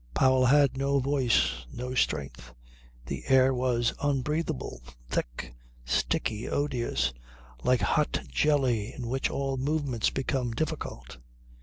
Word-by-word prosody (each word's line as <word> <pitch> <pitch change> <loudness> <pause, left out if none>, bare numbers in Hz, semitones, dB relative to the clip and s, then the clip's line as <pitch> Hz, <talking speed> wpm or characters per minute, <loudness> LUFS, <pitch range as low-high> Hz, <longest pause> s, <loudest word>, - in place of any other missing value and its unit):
Powell 130 -1 +4
had 140 0 +4
no 140 +1 +1
voice, 125 - +2
no 125 +1 -5
strength. 70 - -2 0.5
The 65 +1 -5
air 130 0 +5
was 125 -2 +1
unbreathable, 145 - -1 0.3
thick, - - -3 0.3
sticky, 105 - -1
odious, 130 - 0 0.5
like 125 -1 +3
hot - - +1
jelly 120 - +1
in 120 -3 -6
which 135 +2 0
all 135 -1 -2
movements 140 -3 0
became 130 -3 -2
difficult. 120 - -4
130 Hz, 115 wpm, -28 LUFS, 115-140 Hz, 0.5 s, air